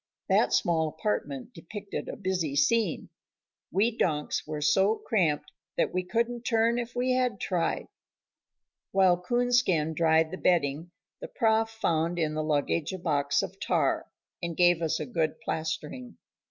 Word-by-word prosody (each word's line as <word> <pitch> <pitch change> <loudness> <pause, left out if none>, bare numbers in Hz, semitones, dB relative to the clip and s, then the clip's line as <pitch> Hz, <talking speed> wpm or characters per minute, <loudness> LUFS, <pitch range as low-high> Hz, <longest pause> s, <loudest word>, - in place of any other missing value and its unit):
That - - +3
small 160 -2 +2
apartment 150 - -3
depicted 200 +5 -7
a - - -5
busy 180 -7 -2
scene. 210 +4 +1 0.6
We 215 +5 +1
donks 150 -9 -1
were 155 -1 -4
so 190 +8 +3
cramped 170 -12 0 0.3
that - - +1
we 185 - +1
couldn't 235 +5 -1
turn 230 0 +2
if 240 +1 -5
we 250 +1 +1
had 250 -5 +1
tried. 175 -3 -1 1.1
While 185 -2 +4
Coonskin 240 -8 +2
dried 160 0 +3
the 185 - -5
bedding, 160 -2 +1 0.3
the - - -6
Prof 225 - +2
found 170 -6 0
in 155 -2 0
the 155 - -1
luggage 155 +1 0
a - - -3
box 145 -5 +1
of - - -7
tar, - - 0 0.3
and 170 -1 -4
gave 175 -1 +4
us 160 -2 0
a 155 - -3
good 155 +3 -1
plastering. 160 - -4
175 Hz, 150 wpm, -28 LUFS, 155-225 Hz, 1.1 s, While